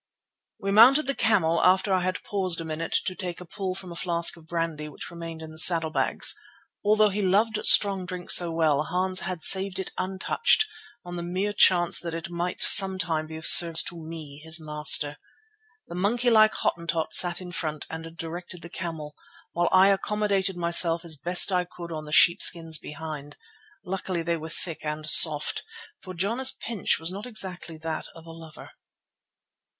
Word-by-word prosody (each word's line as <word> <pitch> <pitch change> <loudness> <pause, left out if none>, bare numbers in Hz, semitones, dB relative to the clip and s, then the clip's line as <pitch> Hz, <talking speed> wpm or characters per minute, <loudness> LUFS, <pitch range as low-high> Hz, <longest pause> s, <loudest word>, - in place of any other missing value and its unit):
We 195 - -5
mounted 255 +9 +4
the 275 - -2
camel 170 -10 -1
after 190 +2 +1
I 185 - -1
had 185 +1 -5
paused 185 -4 -2
a 165 - -8
minute 160 +1 -7
to 185 - -4
take 180 -2 -8
a 180 - -12
pull 185 +1 -7
from 185 -2 -10
a - - -10
flask 170 -1 +1
of 165 -2 -19
brandy 165 -3 -6
which 150 - -10
remained 165 -1 -10
in 160 - -12
the 155 - -7
saddlebags. 165 -2 +2 0.5
Although 215 0 +1
he 205 +1 -5
loved 210 +3 -1
strong 195 -3 +4
drink 180 -1 -5
so 175 -2 +5
well 160 -3 -1
Hans 185 +2 -1
had 175 -3 -7
saved 190 0 +3
it 190 - -5
untouched 190 - 0 0.4
on 175 0 -9
the - - -6
mere 185 +4 -5
chance 175 -3 +2
that 170 -1 -8
it 165 +1 -9
might 175 +1 -5
some 190 -1 +7
time 160 -4 -4
be 160 - -11
of 160 - -9
service 170 -1 +8
to 175 - -5
me, 155 -3 -11
his 160 0 -1
master. 150 -1 +2 0.7
The - - -13
monkey 230 +7 -1
like 215 -1 +3
Hottentot 170 -1 -4
sat 175 -1 +2
in 180 -1 -11
front 155 -3 -6
and 165 +1 -11
directed 175 +2 -8
the 170 - -11
camel, 160 -4 -9 0.4
while 175 0 -2
I 190 +1 +3
accommodated 195 -1 -2
myself 170 0 +3
as 160 -2 +1
best 175 +7 +3
I 180 -1 -1
could 175 -1 -13
on 155 -1 -8
the 150 - -12
sheepskins 165 -1 +4
behind. 150 -1 -10 0.5
Luckily 185 -2 -5
they 170 0 -3
were 160 0 -10
thick 165 0 -7
and 150 0 -7
soft, 150 -1 +5 0.4
for 185 -2 -12
Jana's 230 +9 0
pinch 225 -5 -3
was 165 +2 -4
not 200 +5 -9
exactly 185 -7 -5
that 160 0 -7
of 165 0 -16
a 165 - -13
lover. 165 -1 -14
175 Hz, 185 wpm, -23 LUFS, 160-190 Hz, 0.7 s, service